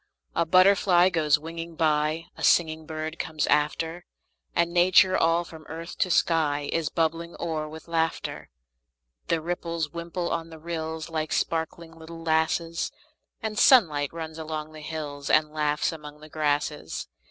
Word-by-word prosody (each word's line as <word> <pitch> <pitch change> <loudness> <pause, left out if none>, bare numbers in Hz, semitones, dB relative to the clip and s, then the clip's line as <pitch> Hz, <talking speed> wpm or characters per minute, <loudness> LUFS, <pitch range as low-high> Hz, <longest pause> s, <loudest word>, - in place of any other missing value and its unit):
A 170 - +1
butterfly 185 0 +5
goes 155 -5 +3
winging 165 +2 -7
by; 155 +1 +1
A - - -9
singing 160 -2 +3
bird 160 +1 -5
comes 155 -2 -1
after; 160 +3 0 0.5
And 170 0 +2
Nature, 185 +1 +5
all 165 +1 +3
from 160 -2 -12
earth 165 +2 -7
to 185 - +2
sky, 150 -4 +2
Is 165 -3 0
bubbling 165 +1 -1
o'er 155 -2 -3
with 160 +1 -11
laughter. 165 -1 -2 0.8
The 165 - +1
ripples 170 -2 -3
wimple 170 +1 -3
on 165 0 -2
the 160 - -10
rills, 160 0 -5
Like 155 -1 -2
sparkling 165 0 -2
little 165 +1 -10
lasses; 165 +1 0 0.5
The 220 -1 -2
sunlight 160 - +5
runs 160 -1 -7
along 155 -1 -5
the 155 0 -11
hills, 150 -2 -5
And 155 0 +3
laughs 150 -1 0
among 150 -2 -10
the 155 +1 -13
grasses. 150 - -2
160 Hz, 150 wpm, -26 LUFS, 155-170 Hz, 0.8 s, butterfly